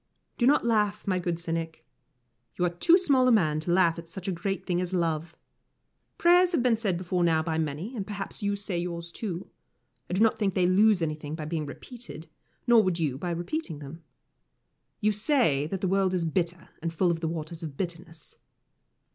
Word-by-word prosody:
Do 240 - +4
not 290 -2 +4
laugh, 210 -3 +1
my 185 -2 +1
good 175 -1 -2
cynic. 165 -1 -4 0.7
You 180 - +1
are 175 - +1
too 330 - +5
small 275 -8 +3
a - - +5
man 155 -9 +3
to 160 +3 -2
laugh 175 -2 +3
at 165 0 -11
such 185 +2 -7
a - - +1
great 195 +3 -3
thing 180 -1 0
as 180 +1 -2
love. 165 -1 -1 0.8
Prayers 355 +1 +5
have 265 - +2
been 245 -3 +4
said 205 -6 -1
before 180 0 -1
now 160 -2 +3
by 160 0 -1
many, 160 - -3
and 200 -4 -4
perhaps 200 -2 -5
you 200 0 0
say 200 -3 -3
yours, 170 -1 -4
too. 185 -2 -5 0.6
I - - -3
do 190 - +1
not 225 - +2
think 195 -4 0
they 185 - +3
lose 195 0 +4
anything 150 -1 -3
by 155 -2 -6
being 155 -1 -3
repeated, 235 - -10 0.4
nor 230 -5 +5
you 160 -7 -1
by 175 - -3
repeating 175 - -3
them. 145 +3 -10 1.0
You 215 0 +3
say 210 - +2
that 190 +3 -4
the 190 - +1
world 190 0 +2
is 175 -2 0
bitter, 170 0 -2
and 165 0 -2
full 175 +2 +2
of 165 - -2
the 165 - -2
Waters 160 +1 -5
of 150 -4 -7
Bitterness. 170 -3 -6
175 Hz, 200 wpm, -27 LUFS, 165-205 Hz, 1.0 s, too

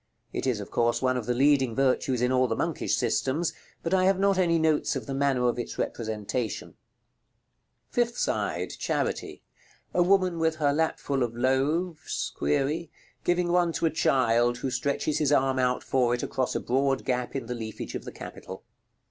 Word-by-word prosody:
It - - -2
is, 120 -5 +1
of 100 - -8
course, 120 0 +2
one 130 0 +2
of 125 -3 -3
the 125 - +1
leading 135 -3 +3
virtues 130 -2 +1
in 125 - +2
all 130 0 +3
the - - -1
monkish - - -1
systems, 155 +6 0 0.3
but 165 - -1
I 185 -1 +4
have 195 0 +4
not 195 0 +2
any 170 -2 +3
notes 160 -2 +1
of - - -4
the 140 - -4
manner 135 -2 +2
of 120 - 0
its 120 - -5
representation. 110 0 -3
§ - - -21
LXXXII. - - -41
Fifth 240 -1 0
side. - - -1
Charity. - - -2 0.5
A 180 - +3
woman 185 -1 +3
with 160 -1 +2
her 145 -2 +1
lap 160 +2 +1
full 140 -2 -1
of 120 -2 -1
loaves(?), 150 +6 0 0.9
giving 175 0 +1
one 175 -1 +3
to 170 - -1
a 160 - +2
child, 120 -5 +2
who 130 +1 -3
stretches 140 +4 -1
his 150 -2 +2
arm 135 -2 +3
out 125 0 +1
for 125 -2 +2
it 120 - -5
across 130 -1 -1
a - - +1
broad 135 +2 0
gap 125 0 -1
in 135 -3 -3
the 125 - -4
leafage 110 -2 -6
of - - -5
the - - -7
capital. - - -9
135 Hz, 190 wpm, -27 LUFS, 125-160 Hz, 0.9 s, I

